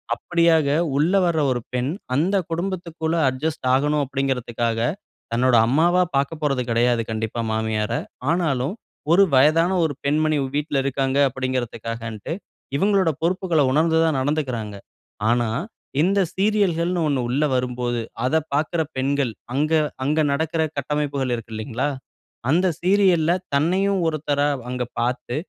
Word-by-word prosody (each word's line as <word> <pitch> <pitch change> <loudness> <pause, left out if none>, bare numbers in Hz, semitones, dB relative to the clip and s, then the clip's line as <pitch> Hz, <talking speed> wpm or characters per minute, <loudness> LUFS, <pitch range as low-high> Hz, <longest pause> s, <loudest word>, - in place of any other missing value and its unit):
அப்பிடியாக 165 0 +2 0.3
உள்ள 160 +6 +2
வர 165 -2 0
ஒரு 120 -2 -1
பெண் 125 +3 -1 0.2
அந்த 175 +8 +1 0.2
குடும்பத்துக்குள்ள 170 -2 -2
அட்ஜஸ்ட் 140 +2 -3
ஆகணும் 145 +2 +1
அப்பிடிங்கறதுக்காக, 125 -4 -1 0.5
தன்னோட 125 +1 +3
அம்மாவா 170 +8 +3
பார்க்கப்போறது 140 -1 0
கிடையாது 120 0 +2
கண்டிப்பா 110 +1 -3
மாமியார. 110 -1 -1 0.4
ஆனாலும் 155 -2 0 0.4
ஒரு 195 +3 +7
வயதான 155 +7 +4
ஒரு 150 - -1
பெண்மணி 155 +1 +1 0.2
வீட்ல 145 -2 0
இருக்காங்க, 135 0 0
அப்பிடின்றதக்காகன்ட்டு 115 -2 -4 0.4
இவுங்களோட 195 -1 +3
பொறுப்புகள 175 -2 +1
உணர்ந்து 160 +3 +3
தான் 155 -4 +1
நடந்துகிறாங்க. 130 -7 -2 0.5
ஆனா, 120 -1 +2 0.5
இந்த 195 +4 +2 0.2
சீரியல்கள்னு 185 -4 +1
1 140 -3 +1
உள்ள 140 +5 +1
வரும்போது 125 -1 -1 0.2
அத 130 - +1 0.2
பார்க்குற 160 +3 0 0.2
பெண்கள் 135 -2 0 0.2
அங்க 150 +4 0 0.3
அங்க 150 +4 +1
நடக்கிற 160 +2 0 0.2
கட்டமைப்புகள் 140 -2 -1
இருக்கு 115 -1 -9
இல்லேங்களா! 120 +5 -2 0.6
அந்த 180 +5 +3
சீரியல்‌ல 180 -3 +3 0.2
தன்னையும் 185 +6 +2
ஒருத்தரா 145 -2 0 0.2
அங்க 125 0 -2 0.2
பார்த்து, 120 0 -2
145 Hz, 120 wpm, -22 LUFS, 125-165 Hz, 0.6 s, ஒரு